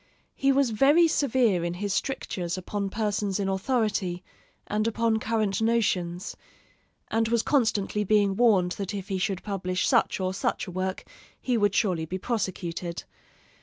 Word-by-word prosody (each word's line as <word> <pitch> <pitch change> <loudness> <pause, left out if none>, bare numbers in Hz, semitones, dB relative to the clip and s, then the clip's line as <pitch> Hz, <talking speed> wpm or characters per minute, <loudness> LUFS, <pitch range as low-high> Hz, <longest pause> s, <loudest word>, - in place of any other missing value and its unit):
He 275 0 +2
was 270 -3 +2
very 290 +10 +5
severe 245 - +2
in 170 0 -2
his 200 +1 -2
strictures 185 -10 -2
upon 200 +2 -3
persons 205 -2 -1
in 195 - -1
authority, 195 -3 -1 0.4
and 215 +1 -1
upon 230 0 +1
current 215 -3 0
notions; 195 -6 0 0.8
and 225 0 +2
was 230 0 +1
constantly 215 -6 +1
being 205 -1 +2
warned 195 -6 +3
that 200 +1 -3
if 195 -1 -6
he 190 -1 -1
should 190 0 -2
publish 185 -3 -1
such - - +2
or 185 0 -1
such - - -1
a 185 - -8
work 185 +1 -3 0.4
he 250 - -1
would 205 -3 +2
surely 180 -7 +1
be 185 +4 -4
prosecuted. 180 -5 -3
205 Hz, 155 wpm, -26 LUFS, 185-225 Hz, 0.8 s, very